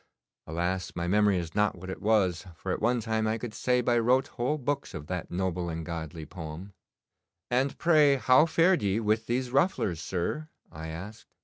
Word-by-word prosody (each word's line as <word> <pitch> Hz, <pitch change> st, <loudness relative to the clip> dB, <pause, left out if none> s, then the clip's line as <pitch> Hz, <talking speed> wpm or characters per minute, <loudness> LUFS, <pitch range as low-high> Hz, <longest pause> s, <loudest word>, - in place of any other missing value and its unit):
Alas! 90 Hz, +3 st, -2 dB
my 85 Hz, 0 st, -2 dB
memory 105 Hz, 0 st, +3 dB
is 85 Hz, -2 st, -4 dB
not 105 Hz, -1 st, +2 dB
what 95 Hz, +1 st, -7 dB
it -, -, -7 dB
was, 95 Hz, -5 st, +2 dB
for -, -, -4 dB
at -, -, -2 dB
one 120 Hz, +2 st, +2 dB
time 110 Hz, -1 st, -1 dB
I 110 Hz, +1 st, 0 dB
could 115 Hz, -1 st, -6 dB
say 125 Hz, +2 st, +1 dB
by 120 Hz, -1 st, +2 dB
rote 130 Hz, +4 st, +2 dB
whole 130 Hz, +5 st, -1 dB
books 140 Hz, +1 st, -3 dB
of 75 Hz, -, -6 dB
that 90 Hz, +1 st, -4 dB
noble 90 Hz, -1 st, -2 dB
and 80 Hz, -1 st, -4 dB
godly 80 Hz, -2 st, -6 dB
poem.' 85 Hz, +3 st, -8 dB, 0.8 s
'And, 130 Hz, +3 st, +1 dB
pray, 155 Hz, -4 st, +5 dB
how 130 Hz, +3 st, +5 dB
fared 170 Hz, +3 st, +3 dB
ye 100 Hz, +1 st, +1 dB
with 110 Hz, 0 st, 0 dB
these 125 Hz, +1 st, -1 dB
rufflers, 135 Hz, -, +1 dB
sir?' 95 Hz, -, -3 dB, 0.2 s
I 80 Hz, +1 st, -7 dB
asked. 100 Hz, +8 st, -8 dB
105 Hz, 190 wpm, -28 LUFS, 90-125 Hz, 0.8 s, pray